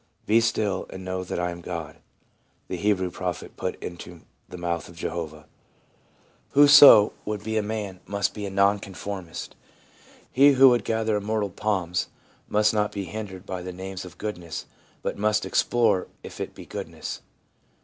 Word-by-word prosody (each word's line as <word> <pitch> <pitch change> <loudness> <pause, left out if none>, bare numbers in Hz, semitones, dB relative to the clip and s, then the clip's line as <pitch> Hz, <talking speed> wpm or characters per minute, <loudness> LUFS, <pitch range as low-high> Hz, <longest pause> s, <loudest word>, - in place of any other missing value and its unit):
' - - -41
Be 115 +2 +4
still, 105 -4 0
and 95 0 -8
know 95 0 -3
that 90 - -4
I 90 0 -1
am 85 0 -8
God/ 85 -3 -6 0.7
the - - -2
Hebrew 95 -1 0
prophet 90 -1 -5
put - - -3
into 85 -1 -8 0.3
the - - -8
mouth 85 -2 -3
of 85 - -14
Jehovah. 85 -2 -4
n 75 - -14
1 - - -28 1.1
Whoso 145 -7 +9
would 105 -1 -4
be 110 0 -3
a 110 - +3
man 105 -3 -4
must 100 -1 -1
be 105 -2 -5
a - - -4
non 100 +1 +3
conformist. 95 -2 -7 0.8
He 140 +3 +6
^ - - +3
who 135 0 +8
would 120 -4 +2
gather 110 -1 0
immortal 105 -1 -1
palms 90 -3 -1 0.4
must 105 +1 +3
not 105 -1 +1
be 100 - -4
hindered 100 -1 -7
by 95 -2 -5
the 90 +1 -6
name 95 +1 -7
of 90 -1 -12
goodness, 90 -7 -5 0.4
but - - -3
must 105 0 +1
explore 115 -6 +2 0.2
if - - -8
it - - -5
be - - -10
goodness. - - -6
100 Hz, 180 wpm, -25 LUFS, 90-105 Hz, 1.1 s, Whoso